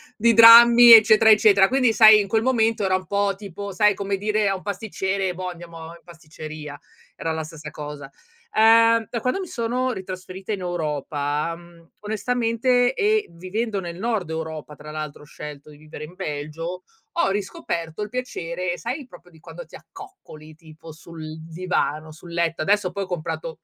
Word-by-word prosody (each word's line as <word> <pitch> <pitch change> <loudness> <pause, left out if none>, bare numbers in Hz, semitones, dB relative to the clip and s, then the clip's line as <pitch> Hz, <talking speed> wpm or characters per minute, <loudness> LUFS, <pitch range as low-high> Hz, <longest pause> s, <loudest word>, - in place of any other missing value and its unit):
di 230 +2 +3
drammi, 235 +1 +9
eccetera, 220 0 +7
eccetera. 200 -2 +5
Quindi 255 -3 +2
sai 215 -2 +7
in 195 - -6
quel 220 +1 +1
momento 225 -4 +1
era 185 - +1
un 185 0 -4
po', 200 0 0
tipo 200 0 -8
sai 210 +2 +3
come 200 0 -3
dire 210 +1 -1
a 195 - 0
un 185 - -9
pasticcere: 195 -2 -3
"Boh, 185 +1 -5
andiamo 170 -2 -10
in 170 0 -14
pasticceria," 155 -3 -10 0.3
era 165 - -4
la 160 0 -4
stessa 155 -1 -10
cosa. 145 -2 -9 0.5
Uhm, 230 0 +5
da 235 - -3
quando 255 - -2
mi 370 - -6
sono 250 0 -2
ritrasferita 185 0 -7
in 195 - -5
Europa, 150 -2 -3
mhmm, 170 -1 -19
onestamente 245 +3 0
e 425 +6 +1
vivendo 195 +4 -4
nel 170 -1 -7
nord 220 -6 -2
Europa 160 -2 -6
tra 150 +1 -11
l'altro, 155 -1 -7
ho - - -15
scelto 150 0 -11
di 150 - -14
vivere 155 +1 -10
in 175 - -15
Belgio, 155 +4 -6 0.3
ho 340 - +2
riscoperto 170 -3 -5
il 210 - -3
piacere 180 -8 -4
sai 255 +3 -6
proprio 180 -5 -17
di 160 - -19
quando - - -11
ti - - -15
accoccoli 380 - -14
tipo 160 0 -14
sul 160 -1 -10
divano, 160 -2 -3
sul 170 +2 -14
letto. 170 -1 -1
Adesso 200 +2 0
poi 200 - -3
ho - - -9
comprato 165 -2 -5
185 Hz, 175 wpm, -22 LUFS, 160-220 Hz, 0.5 s, drammi